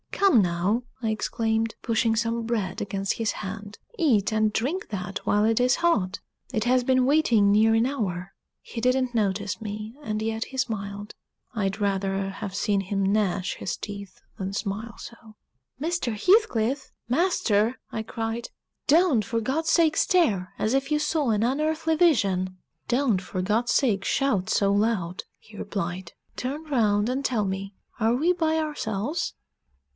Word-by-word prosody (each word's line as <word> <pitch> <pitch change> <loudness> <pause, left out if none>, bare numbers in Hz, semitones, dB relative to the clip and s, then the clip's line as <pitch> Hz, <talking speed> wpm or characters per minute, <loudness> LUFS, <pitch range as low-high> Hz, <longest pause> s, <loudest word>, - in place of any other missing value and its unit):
"Come 390 - +4
now," 185 +6 0 0.2
I 225 - 0
exclaimed, 225 0 -1
pushing 225 -1 +1
some 230 +1 0
bread 220 -5 -2
against 195 -1 -1
his 225 -2 -1
hand, 205 +1 -7 0.2
"eat 225 - +3
and 215 -1 +2
drink 290 +13 -2
that 195 -1 -4
while 210 +1 +3
it 225 +1 +2
is 250 0 +3
hot. 215 - +1 0.3
It 220 -3 +1
has 250 +1 +3
been 255 0 +3
waiting 245 -8 +4
near 220 +2 +5
an 225 +1 +3
hour." 195 -9 -3 0.3
He 230 - -7
didn't 255 0 +1
notice 205 -1 -1
me, 215 +2 -6
and 215 -4 -2
yet 225 0 -2
he 265 - -10
smiled. 205 -5 -3 0.4
I'd 200 -2 -2
rather 195 -1 0
have 195 0 -6
seen 200 -1 +1
him 195 +1 -2
gnash 195 -2 +1
his 185 - -3
teeth 200 -2 -8 0.2
than 190 0 -4
smile 210 +2 -4
so. 235 - -9 0.6
"Mr. 320 -5 -1
Heathcliff! 265 - +2 0.2
master!" 250 - +2
I 220 - -3
cried. 225 +1 -4 0.4
"Don't, 305 - +4
for 230 +1 -1
God's 300 +8 -1
sake, 325 -2 +4
stare 215 - +2
as 215 - 0
if 270 +2 0
you 300 - +4
saw 300 -2 0
an 215 -1 +2
unearthly 310 +5 +1
vision." 195 - +2 0.3
"Don't, 240 -6 +2
for 185 0 -4
God's 215 +6 +1
sake, 205 -8 +2
shout 225 -10 +1
so 200 -1 +2
loud," 200 -4 0
he 215 -1 -16
replied. 180 -3 -4 0.2
"Turn 280 +5 -3
round 215 -6 +2
and 265 +2 -1
tell 220 -5 +1
me, 195 +1 -4 0.2
are 225 +1 +3
we 325 +8 +3
by 320 -2 +1
ourselves?" 295 - -2
220 Hz, 160 wpm, -26 LUFS, 200-260 Hz, 0.6 s, near